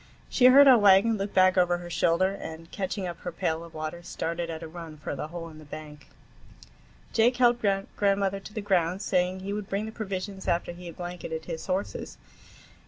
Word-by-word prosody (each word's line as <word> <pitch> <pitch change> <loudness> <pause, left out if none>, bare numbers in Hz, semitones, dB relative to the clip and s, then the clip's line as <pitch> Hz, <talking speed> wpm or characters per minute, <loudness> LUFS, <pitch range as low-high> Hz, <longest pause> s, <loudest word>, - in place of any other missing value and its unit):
She 250 - +3
heard 275 +3 +9
our 255 -3 +8
wagon, 205 +2 +6
looked 200 +1 -4
back 185 0 +5
over 175 -1 +3
her 175 0 -9
shoulder, 170 +3 +2
and 165 -4 -8
catching 195 0 -3
up 175 -1 -5
her 175 - -5
pail 160 0 -2
of 165 -1 -13
water, 155 +2 -5
started 170 0 -4
at 165 0 -5
a - - -6
run 165 -1 -9
for 150 -1 -5
the 145 - -4
hole 165 +1 -7
in 155 -1 -13
the - - -12
bank. 150 -1 -10 1.1
Jake 240 +2 +3
helped 240 -1 +4 0.3
grandmother 195 -1 +1
to 205 +2 -12
the 215 - -2
ground, 185 -1 +1
saying 185 0 0
he 200 +1 -4
would 210 -1 -5
bring 200 +2 -1
the 220 - -6
provisions 195 -2 -5
after 170 0 0
he 175 +1 -10
had 170 - -10
blanketed 175 -2 -6
his 160 -2 -6
horses. 190 +2 -3
180 Hz, 205 wpm, -27 LUFS, 165-200 Hz, 1.1 s, heard